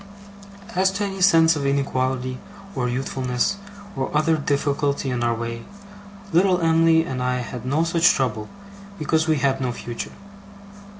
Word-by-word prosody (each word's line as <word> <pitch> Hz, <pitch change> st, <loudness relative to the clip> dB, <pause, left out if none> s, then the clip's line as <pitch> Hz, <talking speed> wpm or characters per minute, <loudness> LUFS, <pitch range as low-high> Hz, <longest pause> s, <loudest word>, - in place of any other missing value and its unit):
As 190 Hz, -1 st, +3 dB
to 205 Hz, +1 st, -2 dB
any 195 Hz, -1 st, -4 dB
sense 165 Hz, -3 st, +5 dB
of 145 Hz, -, -3 dB
inequality, 130 Hz, -2 st, -1 dB, 0.3 s
or 125 Hz, -6 st, -1 dB
youthfulness, 130 Hz, +5 st, -1 dB, 0.4 s
or 135 Hz, -1 st, -2 dB
other 160 Hz, +1 st, +3 dB
difficulty 140 Hz, -1 st, -1 dB
in 120 Hz, -1 st, -1 dB
our 120 Hz, -1 st, +1 dB
way, 115 Hz, 0 st, -5 dB, 0.7 s
little 180 Hz, +1 st, +4 dB
Em'ly 165 Hz, -1 st, +4 dB
and 130 Hz, -3 st, -4 dB
I 125 Hz, 0 st, 0 dB
had 125 Hz, 0 st, -7 dB
no 150 Hz, +5 st, +2 dB
such 170 Hz, +1 st, +4 dB
trouble, 110 Hz, -5 st, -1 dB, 0.5 s
because 160 Hz, +1 st, 0 dB
we 160 Hz, -, +3 dB
had 135 Hz, 0 st, 0 dB
no 125 Hz, -1 st, -1 dB
future. 120 Hz, 0 st, -6 dB
140 Hz, 145 wpm, -22 LUFS, 125-165 Hz, 0.7 s, sense